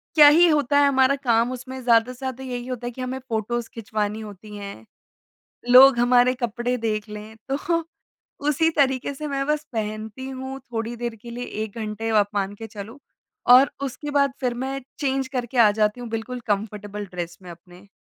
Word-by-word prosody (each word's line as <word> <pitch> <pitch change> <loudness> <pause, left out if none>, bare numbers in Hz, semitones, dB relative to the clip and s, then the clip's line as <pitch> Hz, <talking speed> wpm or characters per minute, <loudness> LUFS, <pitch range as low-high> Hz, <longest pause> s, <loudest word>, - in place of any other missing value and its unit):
क्या 300 -2 +9
ही 335 +4 +7
होता 285 -2 +2
है 285 - +5
हमारा 265 0 +4
काम 235 0 +2
उसमें 255 +1 -7
ज़्यादा 235 0 +4
से - - -16
ज़्यादा 265 -1 -5
यही 245 -1 -5
होता 245 -1 -4
है 245 - -3
कि 255 - -9
हमें 255 +1 -3
फ़ोटोज़ 240 -1 -3
खिंचवानी 215 -1 -3
होती 210 0 -10
हैं, 200 - -9 0.8
लोग 255 +1 +9
हमारे 245 +1 +4
कपड़े 240 +2 -1
देख 215 -2 -2
लें 210 +1 -9 0.2
तो 335 +4 0 0.7
उसी 320 +3 +3
तरीके 270 -2 +1
से 300 +2 -6
मैं 275 -1 -2
बस 300 0 0
पहनती 220 +3 -4
हूँ 265 +1 -6
थोड़ी 230 +1 -3
देर 235 -1 -4
के 235 - -10
लिए 245 +1 -5 0.2
1 220 +1 -8
घंटे 220 +1 -4
आप 210 -2 +3
मान 200 0 -1
के 225 +1 -8
चलो 215 +6 -9 0.5
और 255 +3 +8
उसके 290 +2 -5
बाद 280 -2 +2
फिर 250 -2 0
मैं 270 +1 -3 0.2
चेंज़ 270 -2 -1
करके 250 0 -3
आ 225 -3 +7
जाती 210 +3 0
हूँ 240 - -6
बिल्कुल 230 +3 -4
कंफर्टेबल 205 0 -3
ड्रेस 175 -1 -5
में 180 - -10
अपने। 175 +3 -16
240 Hz, 190 wpm, -23 LUFS, 215-265 Hz, 0.8 s, क्या